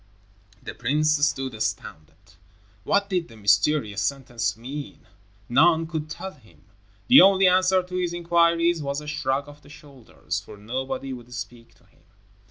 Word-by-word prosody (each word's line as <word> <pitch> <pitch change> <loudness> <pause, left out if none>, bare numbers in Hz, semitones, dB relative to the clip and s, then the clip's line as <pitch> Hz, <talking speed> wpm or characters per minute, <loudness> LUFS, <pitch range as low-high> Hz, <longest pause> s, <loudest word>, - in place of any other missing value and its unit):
The - - -7
prince 150 +3 +1
stood 135 -3 0
astounded. 80 -9 -6 0.5
What 200 0 +1
did 180 -4 -2
the 115 - -15
mysterious 105 +2 +1
sentence 120 0 -2
mean? 140 +5 -8 0.4
None 160 +6 +4
could 160 -2 -5
tell 190 +5 -7
him. 110 - -23 0.4
The 265 +3 +9
only 195 0 +6
answer 185 0 +3
to 180 0 -9
his 180 -2 -1
inquiries 170 -1 +2
was 140 0 -3
a 150 - -10
shrug 145 -2 -2
of 145 0 -14
the 145 - -18
shoulders, 140 -5 -7
for - - -13
nobody 130 +5 -5
would 125 -1 -11
speak 120 -2 -9
to - - -28
him. - - -30
145 Hz, 155 wpm, -24 LUFS, 120-170 Hz, 0.5 s, The